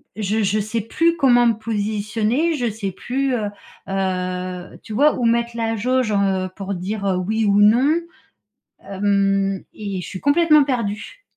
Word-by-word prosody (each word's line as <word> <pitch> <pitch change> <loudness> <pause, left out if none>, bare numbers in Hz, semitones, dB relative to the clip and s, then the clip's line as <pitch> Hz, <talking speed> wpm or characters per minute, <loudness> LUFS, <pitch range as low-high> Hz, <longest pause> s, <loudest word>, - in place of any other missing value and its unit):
je 215 +1 -1
je 205 +2 +1
sais 215 +2 -2
plus 330 +10 +1
comment 245 -5 +4
me 230 - +4
positionner, 220 +7 -1
je 245 -4 -1
sais 205 -2 -4
plus, 260 +7 -2
heu, 210 -3 -2 0.4
heu, 185 -1 -3
tu 220 - -8
vois, 295 +6 +4
où 240 - 0
mettre 235 0 +1
la 225 -1 -1
jauge, 250 +1 0
heu, 195 -2 +1
pour 200 -1 -4
dire, 200 +3 -4
heu: 190 -2 +1
«oui» 220 +5 -1
ou 200 0 +3
«non». 245 +9 +5 0.9
Hem 195 -1 +1
et 200 -3 -5
je - - -7
suis 185 - -6
complètement 305 0 +4
perdue. 245 - -3
215 Hz, 165 wpm, -21 LUFS, 195-240 Hz, 0.9 s, non